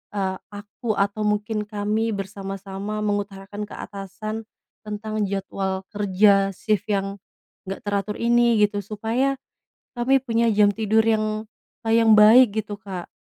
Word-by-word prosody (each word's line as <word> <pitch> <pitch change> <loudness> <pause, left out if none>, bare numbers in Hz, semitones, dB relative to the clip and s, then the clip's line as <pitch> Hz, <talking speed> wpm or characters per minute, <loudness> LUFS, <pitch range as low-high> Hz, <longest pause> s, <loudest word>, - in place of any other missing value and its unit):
eee, 190 -2 -1 0.2
aku 205 +2 -4
atau 200 +2 0
mungkin 210 +1 -1
kami 215 +2 -1
bersama-sama 195 +1 -5
mengutarakan 205 0 -3
ke - - -8
atasan 205 +3 -6 0.4
tentang 215 +1 -4
jadwal 195 -1 -3
kerja 200 0 +3
sif 210 0 -1
yang 195 0 -1 0.5
nggak 195 - -5
teratur 205 0 -1
ini, 235 0 +3
gitu? 205 0 +1
Supaya, 225 +7 -1 0.6
kami 265 +3 +3
punya 230 -2 +1
jam 210 -1 +5
tidur 220 +1 +2
yang, 215 -1 0 0.4
kayak 225 0 +2
yang - - +7
baik, 225 +4 +8 0.2
gitu, 205 0 -6
Kak, 185 -3 -6
210 Hz, 130 wpm, -23 LUFS, 195-220 Hz, 0.6 s, baik